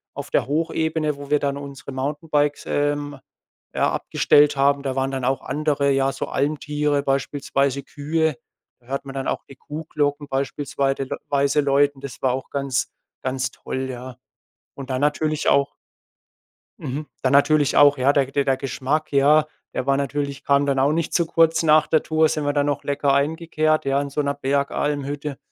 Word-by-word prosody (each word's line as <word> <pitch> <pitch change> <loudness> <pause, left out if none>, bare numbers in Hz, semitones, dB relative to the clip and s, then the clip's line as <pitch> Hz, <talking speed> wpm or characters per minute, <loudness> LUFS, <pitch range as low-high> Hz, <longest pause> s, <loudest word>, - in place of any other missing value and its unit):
auf - - -7
der - - +1
Hochebene, 160 0 -1
wo 140 0 -9
wir 150 - +4
dann 140 -1 -1
unsere 140 -1 -8
Mountainbikes, 145 +2 -1
ähm, 145 -1 -1 0.6
ja, - - +2
abgestellt 145 0 +3
haben. 140 +1 +3
Da 135 -2 -2
waren 135 0 0
dann 135 -1 -3
auch 130 0 0
andere, 145 -2 0
ja, 135 0 +2
so - - -4
Almtiere, 150 0 -1
beispielsweise 140 0 -1
Kühe. 155 +2 -1 0.4
Da 120 - -27
hört 135 +1 -4
man 135 - -8
dann 135 -1 -3
auch - - -2
die 135 - -12
Kuhglocken 145 0 -3
beispielsweite 135 0 -2 0.2
weise 140 +1 +2
läuten. 140 0 +2
Das 140 -2 -8
war 130 - +2
auch 130 0 -5
ganz 135 -3 -1 0.3
ganz 130 -1 -2
toll 130 0 -5
ja. 125 0 -8 0.6
Und 135 -1 -9
dann 130 0 -1
natürlich 150 +1 0
auch 140 0 +2 1.0
Mhm, 145 +4 -5 0.2
dann 130 0 +2
natürlich 145 0 +4
auch, 145 0 +6
ja, 130 +2 +3
de 135 -2 +1
der 140 0 0
der 135 -1 +2
Geschmack 135 +3 -2
ja, 150 +2 +4 0.3
der 130 - -2
war 135 0 +3
natürlich 140 -1 -3
kam 140 0 +3
dann 140 -1 +1
auch 140 +2 +3
nicht 165 +1 -1
zu 170 - +2
kurz. 165 0 +3
Nach 155 -1 +5
der 155 - +2
Tour 160 0 +2
sind 155 -2 -2
wir 145 - +1
dann 145 0 +1
noch 145 -1 -1
lecker 140 -1 +1
eingekehrt, 155 +1 +1
ja, 135 0 +2
in 140 - -4
so 150 - 0
'ner 140 0 -1
Bergalm-Hütte. 140 +1 -2
140 Hz, 180 wpm, -22 LUFS, 135-150 Hz, 1.0 s, auch